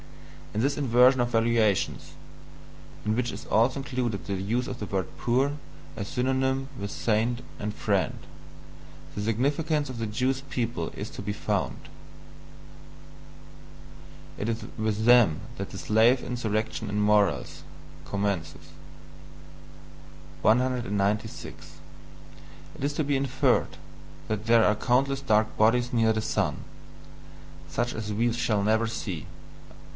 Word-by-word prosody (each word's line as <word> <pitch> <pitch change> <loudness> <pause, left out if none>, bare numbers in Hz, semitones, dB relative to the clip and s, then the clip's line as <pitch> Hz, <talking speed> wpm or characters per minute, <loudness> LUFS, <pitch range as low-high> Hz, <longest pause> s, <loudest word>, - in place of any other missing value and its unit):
In - - +1
this 140 +3 +1
inversion 130 -1 +5
of 120 - +1
valuations 115 -3 +1 0.9
(in 110 0 +1
which 120 -1 0
is 100 - -8
also 120 +5 +2
included 125 -6 -3
the 100 - -3
use 110 +6 -1
of 125 - -6
the 105 - -4
word 95 -2 -1
"poor" 130 +4 +1 0.4
as 100 - -4
synonymous 130 +1 0
with 100 0 -4
"saint" 115 +2 0 0.2
and 105 0 -3
"friend") - - 0 1.0
the 105 - -3
significance 145 +7 0
of 130 - -6
the 115 - -2
Jewish 130 +5 0
people 115 -11 -2
is - - -5
to - - -7
be 100 +1 -3
found; - - -2 2.5
it 105 - -2
is 115 0 -3
with 110 0 -1
THEM 120 -11 +6 0.2
that - - -4
the - - -8
SLAVE 115 +4 +4
INSURRECTION 115 -3 -2
IN 105 - -1
MORALS 105 -3 +2 0.4
commences. 100 -5 -3 1.7
196. 110 -3 0 1.0
It - - -8
is 145 +1 0
to 155 - 0
be 145 0 +1
INFERRED 135 -1 +1 0.5
that 110 +1 -3
there 115 -1 +6
are 105 - +4
countless 135 +4 +1
dark 110 -5 +2
bodies 120 +3 +3
near 115 -1 +4
the 110 0 0
sun - - 0 1.1
such 120 +1 -1
as 110 -1 -4
we 115 +3 +1
shall 110 -4 0
never 110 +2 +2
see. 100 -8 -5
115 Hz, 130 wpm, -27 LUFS, 105-125 Hz, 2.5 s, THEM